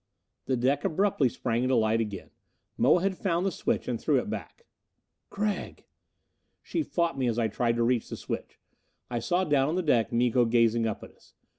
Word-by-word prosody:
The 130 - +1
deck 135 +4 +1
abruptly 165 -6 +2
sprang 115 0 -2
into 130 +1 +2
light 110 0 +2
again. 105 -3 -6 0.4
Moa 160 +8 +3
had 195 -1 +1
found 180 -2 0
the 195 - +1
switch - - -2
and - - -2
threw - - +2
it - - -2
back. 475 - -7 0.6
"Gregg!" 205 0 -3 0.8
She 330 - -2
fought 170 - -1
me 130 - +1
as 115 -1 0
I 115 -2 +2
tried 115 +2 0
to 120 - +1
reach 120 -1 +1
the - - -5
switch. - - -6 0.5
I 120 - -1
saw 180 +9 +1
down 145 -4 +2
on 160 - -1
the 185 - 0
deck 120 -7 +2
Miko 120 0 +3
gazing 115 0 +3
up 110 - -4
at - - -11
us. - - -25
125 Hz, 195 wpm, -28 LUFS, 115-170 Hz, 0.8 s, Moa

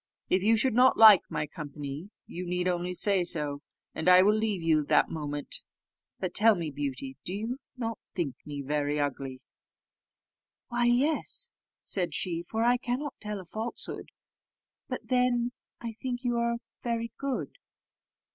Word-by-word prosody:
If 185 - +3
you 225 +3 +4
should 255 +2 +3
not 255 +3 +5
like 215 -4 +10
my 150 - -2
company, 150 +2 -7 0.2
you 180 - -6
need 180 +1 -1
only 180 0 -1
say 195 -1 +3
so, 150 -4 +1 0.3
and 160 +3 +1
I 180 0 +8
will 210 +2 +5
leave 215 -5 -1
you 155 -2 +3
that - - +3
moment. 145 -2 -1 0.6
But 185 -2 -3
tell 220 +1 +5
me, 165 -4 -4
Beauty, 135 -2 -5
do 185 - -4
you 230 +6 -4 0.2
not 230 -2 -3 0.2
think 165 -8 -1
me 145 -1 -6
very 145 +1 -1
ugly?" 135 -2 -3 1.3
"Why, 240 0 +1
yes," 260 +6 +2 0.3
said 180 -3 0
she, 170 -2 -2
"for 220 +6 -2
I 245 +1 +4
cannot 255 +4 -3
tell 210 -1 -4
a 185 - -10
falsehood; 220 +6 -2 0.8
but - - -4
then 250 -1 +2 0.3
I 235 -1 -5
think 245 +2 -5
you 240 -1 0
are 235 0 +1 0.2
very 230 -1 -2
good." 275 -2 -3
190 Hz, 155 wpm, -29 LUFS, 150-235 Hz, 1.3 s, like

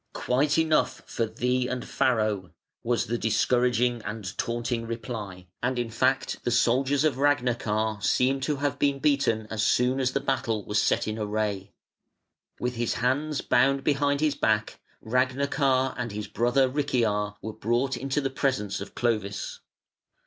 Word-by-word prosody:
"Quite 145 +4 +1
enough 155 -5 +1
for 115 - -2
thee 125 +3 0
and 125 -1 -3
Farro", 110 -7 0 0.3
was 120 0 +1
the 120 +1 -2
discouraging 120 +2 +2
and 105 -2 -5
taunting 115 0 -2
reply: 110 -6 -6 0.2
and 130 +1 0
in 120 -2 -2
fact 130 +4 0
the - - 0
soldiers 130 +4 +2
of 150 -4 +1
Ragnachar 115 -6 +1
seem 130 +5 +2
to 140 +2 -1
have 140 -1 -2
been 140 -1 +2
beaten 135 -6 +1
as 110 -1 -1
soon 125 +4 +2
as 130 -1 0
the - - +1
battle 115 -6 -1
was 105 0 +1
set - - +1
in 110 +1 -3
array. 105 -2 -2 0.9
With 125 0 -2
his 120 -1 0
hands 140 +5 0
bound 135 +2 +2
behind 145 0 +1
his 155 -2 +2
back, 110 -5 0 0.2
Ragnachar 130 +2 +1
and 120 -2 -4
his 105 0 -5
brother 120 +3 +2
Richiar 115 -7 0
were 110 - -5
brought 120 +5 0
into 135 +3 -1
the 135 -1 -2
presence 130 -9 -1
of 100 - -8
Clovis. 105 -4 -2
125 Hz, 155 wpm, -27 LUFS, 110-135 Hz, 0.9 s, discouraging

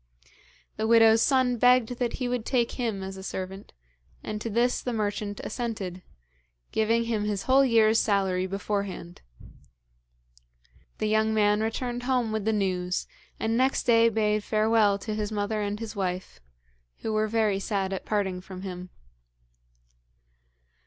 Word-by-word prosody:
The 220 0 -1
widow's 225 -1 +6
son 255 -2 +2
begged 245 -1 +4
that 240 -2 -1
he 255 - -3
would 245 -2 -2
take 240 -1 0
him 225 -6 -3
as 190 0 -6
a - - -8
servant, 190 +1 -6 0.5
and 210 0 -5
to 230 - -3
this 235 +3 +1
the 245 - -3
merchant 205 -1 -2
assented, 205 -7 -4 0.7
giving 225 +1 +2
him 225 -3 -1
his 205 -2 -2
whole 265 +1 +5
year's 225 -3 +4
salary 190 -3 +1
beforehand. 195 -2 -4 1.8
The 215 - -2
young 220 +1 +2
man 210 0 +3
returned 240 +2 -2
home 250 -3 0
with 215 -2 -2
the 220 - +2
news, 185 -3 -1 0.3
and 225 +1 0
next 260 +3 +2
day 230 -1 +5
bade 215 -1 0
farewell 215 -1 +3
to 215 +2 -5
his 210 0 -3
mother 210 +1 -1
and 205 0 -3
his 225 -1 -6
wife, 185 -2 -3 0.6
who 220 - -2
were 215 0 +1
very 215 -3 +1
sad 195 -1 -2
at 190 - -4
parting 190 -4 -1
from 185 0 -9
him. 180 -1 -7
215 Hz, 150 wpm, -27 LUFS, 200-230 Hz, 1.8 s, widow's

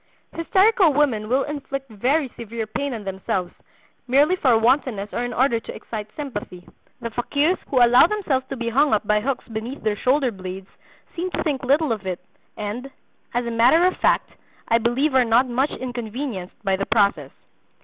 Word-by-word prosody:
Hysterical 380 +1 +3
women 245 -7 +1
will 265 +2 +2
inflict 275 -2 -5
very 265 +8 +1
severe 230 -1 -6
pain 280 +6 -3
on 215 - -7
themselves—merely 195 - -2
for 255 -9 +4
wantonness 225 -3 +1
or 240 - -1
in 245 - -3
order 245 -1 +2
to - - -9
excite 215 -1 -6
sympathy. 205 - -7 0.3
The 230 0 -4
fakirs 285 +9 0
who 250 -3 +5
allow 245 +6 +6
themselves 305 -11 -1
to - - -4
be 235 -2 -3
hung 275 +1 +3
up 210 - -2
by 210 0 +2
hooks 265 +2 -3
beneath 230 +4 -6
their 215 -1 +1
shoulder 260 +3 +1
blades 190 -1 -8 0.5
seem 355 +2 -2
to - - -3
think 285 -5 -2
little 285 +2 +2
of 205 -4 -3
it 180 -2 -3 0.4
and, 220 +6 -5 0.5
as 245 0 0
a 235 - -3
matter 250 +10 +5
of 370 - +2
fact, - - +1 0.4
I 230 - +3
believe 255 +6 +1
are 260 -1 +5
not 240 +2 +3
much 260 +4 0
inconvenienced 240 -5 -5
by 190 -1 +2
the 195 - -3
process." 205 -3 +2
245 Hz, 180 wpm, -22 LUFS, 215-280 Hz, 0.5 s, allow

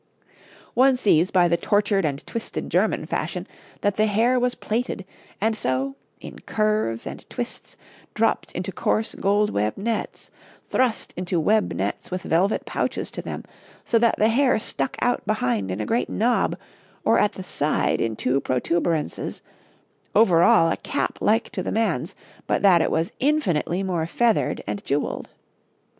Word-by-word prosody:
One 265 +1 +5
sees 185 -7 +3
by 180 -2 +4
the 170 0 +2
tortured 205 -1 +1
and 145 0 -3
twisted 230 - -5
German - - +1
fashion - - -3 0.4
that 205 -1 0
the 215 +1 +3
hair 230 +5 +3
was 250 0 0
plaited, 220 -3 -3 0.3
and 220 +2 +1
so, 135 -4 -1 0.2
in - - -10
curves 215 - 0
and - - -8
twists, 245 -1 -6 0.4
dropped - - +1
into - - -3
coarse 220 - 0
gold 205 +1 +1
web 105 +1 -1
nets, 225 +2 -3 0.4
thrust 250 -4 0
into 180 -1 -1
web 215 +6 +2
nets 95 +4 -3
with 185 0 -4
velvet 185 +6 +1
pouches - - -2
to - - -5
them, - - -6 0.4
so 230 - +3
that 230 0 +3
the 215 - +4
hair 255 +2 +3
stuck 135 -10 -3
out 245 - +1
behind 125 - 0
in 95 +2 -3
a 105 - -2
great 235 +2 0
knob, 240 +2 +1 0.5
or - - +4
at 210 - +2
the 190 - -7
side 155 -4 0
in 115 -1 -1
two 130 +5 +1
protuberances; 160 +4 -1 0.7
over 190 -6 +5
all 165 -1 +5
a - - -1
cap - - -2
like 225 +2 +2
to 190 - -3
the - - -3
man's, 225 0 -1 0.3
but - - 0
that 180 -4 +6
it - - +1
was 165 +2 0
infinitely 195 - +1
more 175 -4 -1
feathered 230 +4 +1
and 200 - -4
jewelled. 145 +1 -2
195 Hz, 160 wpm, -24 LUFS, 160-225 Hz, 0.7 s, that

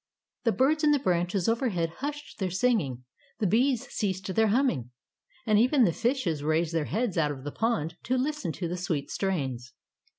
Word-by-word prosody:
The 230 - +4
birds 300 +6 +2
in 300 - +5
the 295 - +5
branches 180 -4 0
overhead 225 -9 0
hushed 295 -2 -5
their 190 -2 0
singing; 180 - 0 0.3
the 215 - -1
bees 250 +6 +2
ceased 190 -2 -2
their 220 +2 +3
humming, 215 - +1 0.6
and 215 -2 +4
even 255 +3 +4
the 175 -7 +3
fishes 230 - 0
raised 155 +2 +1
their 160 -2 0
heads 215 -1 -1
out 150 -2 +2
of 135 -3 -6
the 145 - -4
pond 190 -8 -1
to 255 +1 +1
listen 275 - -1
to 175 - -3
the 175 +2 -3
sweet 165 -5 -2
strains. 135 -10 -2
195 Hz, 185 wpm, -28 LUFS, 165-250 Hz, 0.6 s, in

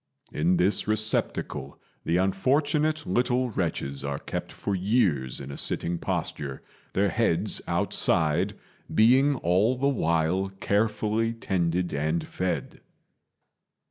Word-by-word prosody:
In 85 +4 +2
this 95 +5 +2
receptacle 110 -10 -1 0.3
the 85 - +2
unfortunate 145 - +1
little 125 +5 +1
wretches 75 -8 -2
are 70 0 -2
kept - - -5
for 100 - -4
years 95 - +1
in 70 0 -7
a - - -7
sitting 85 0 0
posture, 70 -3 -3 0.3
their 100 +1 +2
heads 110 -7 +1
outside, 85 +6 +1 0.4
being 130 +6 +5
all 100 +4 +2
the 135 +2 0
while 85 - +1
carefully 110 +2 0
tended 90 -5 -1
and 80 +3 -1
fed.... 90 -1 -3
95 Hz, 110 wpm, -26 LUFS, 80-115 Hz, 0.4 s, being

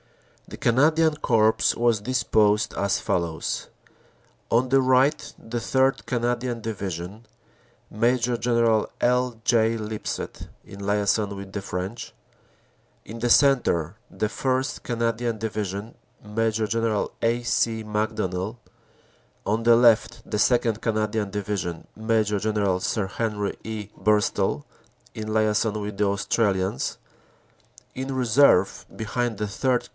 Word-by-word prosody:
The - - -9
Canadian 155 +6 +3
Corps 110 -6 +3 0.2
was 115 -3 +2
disposed 105 -3 +2
as 100 0 0
follows: 85 -2 -2 0.8
On 120 +3 +3
the 135 +1 +4
right 130 +3 +2
the 120 +1 -5
3rd. 130 +4 +1
Canadian 120 0 -1
Division, 100 -1 -5 0.6
Major 120 +2 +1
General 115 -2 +2
L. 125 -1 +1
J. 115 -1 +3
Lip 110 -1 -6
sett, - - -5 0.2
in 100 - -11
liason 100 0 0
with 100 -1 -9
the 100 - -3
French; 95 +4 -5 0.9
in 115 +2 -8
the 120 +1 0
centre, 115 - +3
the - - -2
1st, 130 +4 -1
Canadian 115 -1 -1
Division, 105 -1 -4 0.3
Major 110 +1 -1
General 115 -1 0
A. 120 +1 +1
C. 115 -1 0
Macdonell; 105 -1 -2 0.9
on 110 +2 0
the 115 0 +6
left, 115 -2 +3
the - - -1
2nd. 115 -1 +2
Canadian 110 -1 -1
Division, 100 -4 -4
Major 110 -2 +1
General 105 -3 0
Sir 105 +1 -1
Henry 105 -1 -2
E. 110 -2 -6
Burstall, 105 -7 +1 0.5
in 110 0 -5
liason 110 0 +1
with 105 0 -5
the 105 - +2
Australians; 100 - 0 1.0
in 130 +1 -4
reserve, 125 -5 +3
behind 115 0 -2
the 105 - -2
3rd. 125 +4 0
110 Hz, 120 wpm, -24 LUFS, 105-120 Hz, 1.0 s, the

